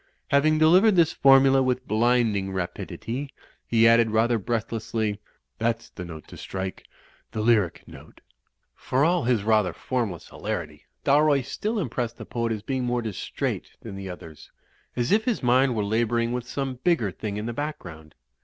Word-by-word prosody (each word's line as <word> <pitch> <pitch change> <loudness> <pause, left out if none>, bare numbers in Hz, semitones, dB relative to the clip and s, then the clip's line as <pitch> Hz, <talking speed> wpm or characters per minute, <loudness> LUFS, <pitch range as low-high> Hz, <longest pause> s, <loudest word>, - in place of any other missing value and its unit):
'' - - -43
Having 155 +2 +3
delivered 185 +7 +5
this 170 -3 +4
formula 135 0 +5
with 130 0 -1
blinding 110 -3 +1
rapidity, 115 +8 -5 0.4
he 115 -1 +4
added 115 0 +5
rather 115 +2 +2
breathlessly, 110 -1 -2 0.4
''that's 115 0 -2
the 90 - -7
note 80 -3 -9
to - - -11
strike, 95 0 -6 0.5
the - - -3
lyric 105 -6 +2
note." - - -14 0.5
For 135 +3 0
all 175 -2 +2
his 120 -5 +1
rather 105 -5 +2
formless 115 - -3
hilarity, - - -5 0.2
Dalroy 145 0 +4
stiD 215 - -2
impressed 120 - -3
the - - -8
poet 115 -1 -2
as 105 -2 -3
being 130 -2 -2
more 120 -1 -1
distrait 110 -4 -4
than 110 -4 -8
the 95 -1 -7
others, 80 -4 -11 0.5
as 120 0 -1
if 215 +2 +3
his 235 - -1
mind 125 +1 +3
were 105 -2 0
labouring 115 +2 0
with 125 -1 -4
some 135 -3 -3
bigger 160 - +2
thing 105 +2 -5
in 105 - -4
the 120 - -3
background. 85 - -7
115 Hz, 165 wpm, -25 LUFS, 105-135 Hz, 0.5 s, delivered